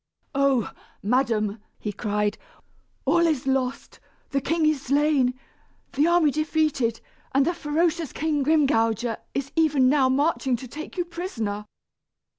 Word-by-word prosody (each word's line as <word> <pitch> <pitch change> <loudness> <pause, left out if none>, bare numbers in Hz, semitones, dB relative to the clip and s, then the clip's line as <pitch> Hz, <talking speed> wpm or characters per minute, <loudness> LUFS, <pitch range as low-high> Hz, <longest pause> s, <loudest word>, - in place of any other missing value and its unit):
"Oh! 275 -5 +2 0.3
madam," 220 -2 +1 0.2
he 210 - -4
cried, 210 +1 -1 0.7
"all 340 +5 +4
is 300 -6 0
lost. 265 -1 -2 0.3
The 275 -1 0
king 325 +3 +1
is 305 -3 +2
slain, 275 -2 +2 0.5
the 295 +3 +3
army 340 -4 +4
defeated, 305 -6 0 0.4
and 275 0 +4
the 345 - +1
ferocious 330 0 0
King 305 -2 -1
Grimgouger 240 -7 +2 0.2
is 275 0 -2
even 295 -5 +4
now 270 -2 +3
marching 275 -1 +1
to 255 +2 -8
take 310 +8 -8
you 355 - 0
prisoner." 225 - -4
275 Hz, 130 wpm, -25 LUFS, 245-310 Hz, 0.7 s, all